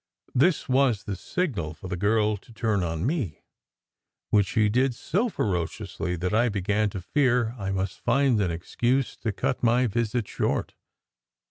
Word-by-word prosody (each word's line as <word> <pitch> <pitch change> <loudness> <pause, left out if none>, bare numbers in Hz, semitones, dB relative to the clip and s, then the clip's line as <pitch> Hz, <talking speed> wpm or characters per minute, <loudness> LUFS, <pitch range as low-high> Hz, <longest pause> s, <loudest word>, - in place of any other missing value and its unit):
This 155 +6 +3
was 130 -5 +2
the 100 - -4
signal 100 - -2
for 95 - -9
the 90 - -3
girl 105 +3 +2
to 100 - -14
turn 110 -3 0
on 85 +1 -2
me, 130 - -2 0.9
which 105 -2 +4
she 110 +4 +2
did 125 +4 +2
so 205 - 0
ferociously 90 - -2
that 90 +3 -2
I 120 +3 +3
began 105 +1 0
to 95 -1 -6
fear 125 +1 +2
I 95 -1 -3
must 95 -1 -2
find 135 -6 +2
an 95 - +1
excuse 120 +10 0
to 110 - -2
cut 110 +5 -2
my 120 +2 +3
visit 115 0 -1
short. - - -1
110 Hz, 160 wpm, -26 LUFS, 95-125 Hz, 0.9 s, which